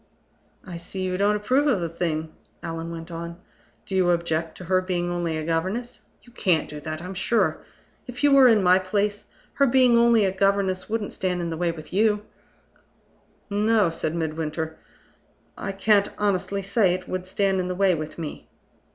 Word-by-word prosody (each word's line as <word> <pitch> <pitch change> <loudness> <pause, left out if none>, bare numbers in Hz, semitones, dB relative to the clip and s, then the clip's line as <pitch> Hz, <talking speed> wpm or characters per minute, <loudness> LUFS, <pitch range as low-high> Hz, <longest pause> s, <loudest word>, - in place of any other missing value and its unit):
"I 180 -4 -7
see 185 +3 -5
you 185 0 -1
don't 205 +2 +2
approve 255 +8 +1
of 260 -9 +2
the 170 - -2
thing," 160 -1 -3 0.3
Allan 165 0 -5
went 165 0 -8
on. 170 +1 -6 0.5
"Do 190 - -4
you 185 -2 +3
object 165 -2 -1
to - - -9
her 185 +1 +2
being 175 -1 -2
only 170 -2 -2
a 155 - -4
governess? 190 +9 -2 0.2
You 240 - -18
can't 175 -9 +1
do 150 - -8
that, 155 +2 -6
I'm 185 +1 -6
sure. 210 +5 0 0.4
If 250 +1 -7
you 290 - +5
were 270 -2 +8
in 220 -4 +4
my 180 +1 +5
place, 205 +2 -1 0.3
her 280 - +3
being 250 -1 +5
only 235 -3 +5
a 190 - +1
governess 195 -1 0
wouldn't 220 -2 -2
stand 180 -1 -1
in 170 -1 -3
the - - -2
way 175 0 0
with 155 0 -11
you?" 210 +1 +2 1.2
"No," 210 -2 +2
said 160 0 -2
Midwinter; 160 0 -3 0.8
"I 195 - -4
can't 200 +1 +3
honestly 200 -1 -1
say 195 -2 +2
it 185 0 -8
would 185 0 -4
stand 195 0 +1
in 180 - -1
the 180 - -3
way 195 0 +3
with 155 -1 -5
me." 160 -3 -7
185 Hz, 185 wpm, -24 LUFS, 170-205 Hz, 1.2 s, were